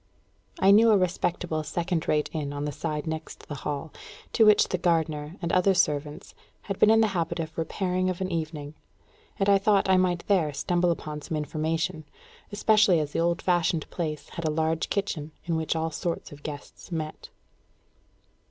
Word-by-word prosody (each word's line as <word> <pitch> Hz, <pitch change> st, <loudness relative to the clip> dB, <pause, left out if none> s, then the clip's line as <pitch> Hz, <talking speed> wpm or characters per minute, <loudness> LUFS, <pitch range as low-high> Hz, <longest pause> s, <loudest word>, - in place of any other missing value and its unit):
I 195 Hz, -, +6 dB
knew 225 Hz, +3 st, +7 dB
a 215 Hz, -, +6 dB
respectable 175 Hz, -3 st, -1 dB
second 170 Hz, +2 st, -2 dB
rate 150 Hz, -1 st, +2 dB
inn 145 Hz, -3 st, -3 dB
on 145 Hz, 0 st, -3 dB
the 150 Hz, -, -2 dB
side 150 Hz, +1 st, -3 dB
next 160 Hz, 0 st, -6 dB
the -, -, -5 dB
Hall, 145 Hz, +2 st, -5 dB, 0.4 s
to 220 Hz, -, +5 dB
which 210 Hz, -, +5 dB
the 185 Hz, -, -1 dB
gardener 160 Hz, -2 st, 0 dB
and 170 Hz, -, -1 dB
other 185 Hz, +1 st, +4 dB
servants 150 Hz, -5 st, -1 dB, 0.3 s
had 195 Hz, -2 st, -5 dB
been 215 Hz, -, +6 dB
in 225 Hz, 0 st, +6 dB
the 220 Hz, -, +3 dB
habit 170 Hz, -2 st, -1 dB
of 160 Hz, -1 st, -4 dB
repairing 185 Hz, +2 st, -1 dB
of 185 Hz, -, -3 dB
an 190 Hz, 0 st, -2 dB
evening; 155 Hz, -3 st, -4 dB, 0.6 s
and 195 Hz, -, 0 dB
I 200 Hz, -1 st, +5 dB
thought 200 Hz, 0 st, +3 dB
I 190 Hz, -, +5 dB
might 180 Hz, -2 st, +1 dB
there 170 Hz, -7 st, +2 dB
stumble 175 Hz, +5 st, +1 dB
upon 150 Hz, -3 st, -3 dB
some 155 Hz, -, -4 dB
information, 155 Hz, +2 st, -2 dB, 0.5 s
especially 210 Hz, -3 st, +4 dB
as 150 Hz, -1 st, -2 dB
the -, -, -2 dB
old 170 Hz, 0 st, +1 dB
fashioned 170 Hz, -3 st, +1 dB
place 155 Hz, -4 st, -4 dB
had 170 Hz, -, -6 dB
a -, -, +2 dB
large 160 Hz, +1 st, 0 dB
kitchen 160 Hz, -7 st, -2 dB
in 170 Hz, -, -1 dB
which 160 Hz, 0 st, -1 dB
all 160 Hz, 0 st, -1 dB
sorts 170 Hz, +2 st, -4 dB
of 145 Hz, 0 st, -12 dB
guests 145 Hz, +4 st, -9 dB
met. 155 Hz, -2 st, -5 dB
165 Hz, 185 wpm, -27 LUFS, 155-185 Hz, 0.6 s, knew